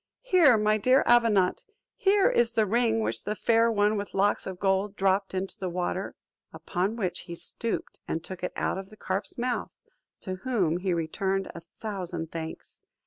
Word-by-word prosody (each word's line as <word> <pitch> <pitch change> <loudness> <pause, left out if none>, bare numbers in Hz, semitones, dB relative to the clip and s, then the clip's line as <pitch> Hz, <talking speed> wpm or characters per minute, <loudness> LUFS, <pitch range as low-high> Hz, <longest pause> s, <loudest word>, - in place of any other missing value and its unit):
Here, 345 - +5
my 215 0 +2
dear 255 +5 +4
Avenant, 225 -6 +3 0.3
here 390 0 +4
is 235 -1 +2
the 220 -2 +3
ring 225 +1 +2
which - - -1
the 210 - -2
Fair 230 +1 +3
One 210 0 +2
with 200 0 -5
Locks 200 +1 +1
of 190 -1 -5
Gold 195 +1 +1
dropped 195 0 +1
into 190 +1 -3
the 185 - -2
river." 180 +2 -3 0.4
Upon 190 +4 -2
which 190 -6 -2
he 170 -1 -8
stooped 230 +6 -5
and 165 - -2
took 185 0 -8
it 180 - -2
out - - -1
of 195 0 -9
the 215 - -15
carp's 190 0 -3
mouth; 245 +1 -1 0.5
to 185 -1 -4
whom 190 -8 0
he 185 +1 -1
returned 190 +4 -1
a 170 - -8 0.2
thousand 180 -6 -4
thanks. 160 -1 -7
200 Hz, 180 wpm, -27 LUFS, 185-225 Hz, 0.5 s, Here